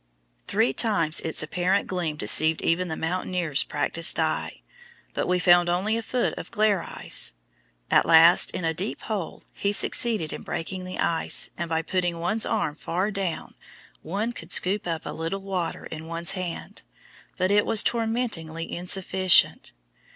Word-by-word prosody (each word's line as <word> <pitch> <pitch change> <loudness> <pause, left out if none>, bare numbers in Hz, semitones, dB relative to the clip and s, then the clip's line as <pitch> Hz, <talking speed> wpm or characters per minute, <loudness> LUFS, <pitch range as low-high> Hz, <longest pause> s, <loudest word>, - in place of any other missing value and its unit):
Three 130 - +1
times 165 -8 +2
its 160 -1 +1
apparent 180 +5 0
gleam 175 -5 -3
deceived 155 +1 +4
even 180 +2 +1
the 160 - -4
mountaineer's 175 -3 0
practiced 155 +3 -1
eye, - - -2 0.5
but - - -2
we 180 - +2
found 175 -1 +4
only 190 +5 0
a 230 - -2
foot 245 +2 -1
of - - -9
"glare 210 -4 +1
ice." - - -2 0.6
At - - +4
last, 165 +2 +6
in 180 - -3
a 160 - 0
deep 185 +7 -3
hole, 205 -7 -5
he 200 - -1
succeeded 205 -5 +1
in - - -7
breaking 185 +2 -5
the 185 - -7
ice, 165 -1 +1
and 170 -1 -5
by 160 0 -1
putting 175 -1 -2
one's 215 +6 0
arm 200 -9 -1
far 180 +6 -2
down 195 -4 -4 0.5
one 205 +8 -3
could 165 -5 -10
scoop 195 +1 +2
up 165 -2 -3
a - - -4
little 165 +5 -4
water 185 -3 -4
in 160 0 -8
one's 170 +2 -2
hand, 185 -3 -6 0.6
but 185 +1 +1
it 205 0 +4
was 225 -2 +5
tormentingly 220 -9 -2
insufficient. 185 +1 +2
180 Hz, 160 wpm, -25 LUFS, 165-200 Hz, 0.6 s, last